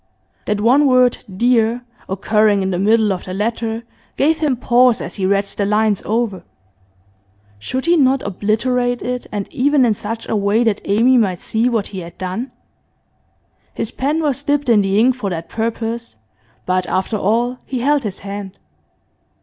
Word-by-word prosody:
That 210 Hz, -1 st, -1 dB
one 265 Hz, +6 st, +4 dB
word 255 Hz, -1 st, +3 dB
'dear,' 235 Hz, +3 st, +1 dB, 0.3 s
occurring 205 Hz, +1 st, +2 dB
in 190 Hz, -, -1 dB
the 180 Hz, -, -1 dB
middle 215 Hz, +1 st, +3 dB
of 180 Hz, -, -7 dB
the 185 Hz, -, -5 dB
letter, 225 Hz, +2 st, -2 dB, 0.3 s
gave 310 Hz, +3 st, +2 dB
him 295 Hz, -5 st, +1 dB
pause 245 Hz, 0 st, +3 dB
as -, -, -6 dB
he 190 Hz, -2 st, -1 dB
read 200 Hz, +1 st, +2 dB
the 200 Hz, -, -4 dB
lines 210 Hz, 0 st, +1 dB
over. 215 Hz, -5 st, -1 dB, 1.2 s
Should 260 Hz, -, -3 dB
he 340 Hz, +1 st, +4 dB
not 270 Hz, -2 st, +3 dB
obliterate 240 Hz, +5 st, 0 dB
it, 250 Hz, 0 st, -4 dB
and 205 Hz, -2 st, -3 dB
even 280 Hz, 0 st, +3 dB
in 225 Hz, -, +3 dB
such 220 Hz, +2 st, -6 dB
a -, -, -1 dB
way 205 Hz, +3 st, +2 dB
that 220 Hz, -3 st, 0 dB
Amy 240 Hz, +5 st, +4 dB
might 185 Hz, -6 st, 0 dB
see 225 Hz, +3 st, 0 dB
what 225 Hz, -4 st, 0 dB
he 190 Hz, -, -4 dB
had 170 Hz, -1 st, -10 dB
done? 190 Hz, +8 st, -4 dB, 1.2 s
His 225 Hz, -, -3 dB
pen 295 Hz, +6 st, -1 dB
was 280 Hz, -2 st, 0 dB
dipped 290 Hz, -2 st, 0 dB
in 220 Hz, -3 st, +5 dB
the 195 Hz, 0 st, 0 dB
ink 250 Hz, +3 st, +4 dB
for 225 Hz, -6 st, -3 dB
that 165 Hz, -2 st, -5 dB
purpose, 230 Hz, -, -3 dB, 0.5 s
but 185 Hz, -1 st, 0 dB
after 190 Hz, +5 st, -1 dB
all 235 Hz, +5 st, 0 dB
he 255 Hz, -2 st, -3 dB
held 290 Hz, +2 st, +2 dB
his 205 Hz, -5 st, -5 dB
hand. 200 Hz, -1 st, -7 dB
225 Hz, 175 wpm, -18 LUFS, 200-250 Hz, 1.2 s, in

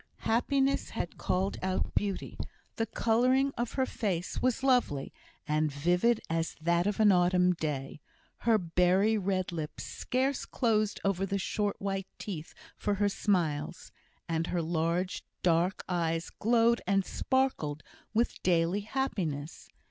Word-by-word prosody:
Happiness 270 Hz, +4 st, +1 dB
had -, -, -5 dB
called 190 Hz, +2 st, 0 dB
out 185 Hz, 0 st, -1 dB
beauty; 200 Hz, -2 st, -2 dB, 0.4 s
the 225 Hz, -, 0 dB
colouring 255 Hz, +5 st, +2 dB
of 240 Hz, -1 st, -2 dB
her 265 Hz, -, +1 dB
face 185 Hz, -8 st, -2 dB
was 255 Hz, +1 st, +1 dB
lovely, 245 Hz, -, +2 dB, 0.3 s
and 155 Hz, 0 st, +1 dB
vivid 175 Hz, +11 st, +2 dB
as 165 Hz, 0 st, -1 dB
that 170 Hz, +3 st, +2 dB
of 205 Hz, 0 st, -1 dB
an 215 Hz, -2 st, +6 dB
autumn 180 Hz, 0 st, +4 dB
day; 150 Hz, -3 st, -4 dB, 0.4 s
her 230 Hz, -2 st, +3 dB
berry 180 Hz, +4 st, +3 dB
red 190 Hz, -3 st, -1 dB
lips 160 Hz, -3 st, -5 dB
scarce 260 Hz, +2 st, -1 dB
closed 215 Hz, -3 st, 0 dB
over 195 Hz, -1 st, +1 dB
the 195 Hz, +1 st, -1 dB
short 205 Hz, +1 st, -1 dB
white 195 Hz, -1 st, -2 dB
teeth 165 Hz, -6 st, -6 dB, 0.2 s
for 205 Hz, -, -1 dB
her 205 Hz, +1 st, +2 dB
smiles; 170 Hz, -6 st, -1 dB, 0.4 s
and 165 Hz, 0 st, -1 dB
her 175 Hz, -2 st, -1 dB
large 170 Hz, +3 st, -1 dB, 0.2 s
dark 175 Hz, +2 st, +2 dB
eyes 165 Hz, -2 st, -1 dB
glowed 235 Hz, +1 st, +3 dB
and 195 Hz, -1 st, +2 dB
sparkled 260 Hz, -, 0 dB, 0.3 s
with 230 Hz, +2 st, 0 dB
daily 175 Hz, +2 st, +2 dB
happiness. 185 Hz, -, -3 dB
190 Hz, 135 wpm, -30 LUFS, 165-225 Hz, 0.4 s, an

